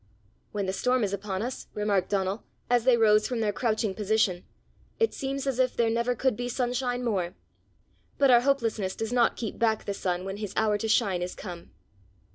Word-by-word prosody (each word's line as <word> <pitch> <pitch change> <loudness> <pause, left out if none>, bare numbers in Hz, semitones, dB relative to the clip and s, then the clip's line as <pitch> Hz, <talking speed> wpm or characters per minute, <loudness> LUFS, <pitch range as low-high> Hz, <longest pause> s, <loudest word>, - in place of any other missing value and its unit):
"When 205 -2 -2
the 190 - -2
storm 250 +3 +1
is 200 -1 -1
upon 195 0 -3
us," 250 +2 -5
remarked 210 -3 +1
Donal, 195 +1 -1 0.3
as 245 -1 +3
they 255 -2 +5
rose 215 -2 +4
from 245 -2 -2
their 210 -2 0
crouching 220 -2 0
position, 210 -3 +1 0.5
"it 455 0 +2
seems 275 0 -3
as 265 -2 -1
if 255 -1 +2
there 230 -1 +3
never 235 +2 0
could 260 0 +1
be 245 +2 -3
sunshine 245 0 -1
more; 190 -7 -1 0.8
but 275 -2 +5
our 240 -1 +7
hopelessness 230 -8 0
does 225 +1 -3
not 240 -2 +3
keep 225 -4 -5
back 220 -2 +1
the 200 - -2
sun 180 -1 -2
when 195 +1 -4
his 205 -2 -6
hour 215 -1 +2
to 225 - -2
shine 195 -4 +2
is 180 0 -4
come." 175 -1 -8
220 Hz, 200 wpm, -27 LUFS, 200-245 Hz, 0.8 s, our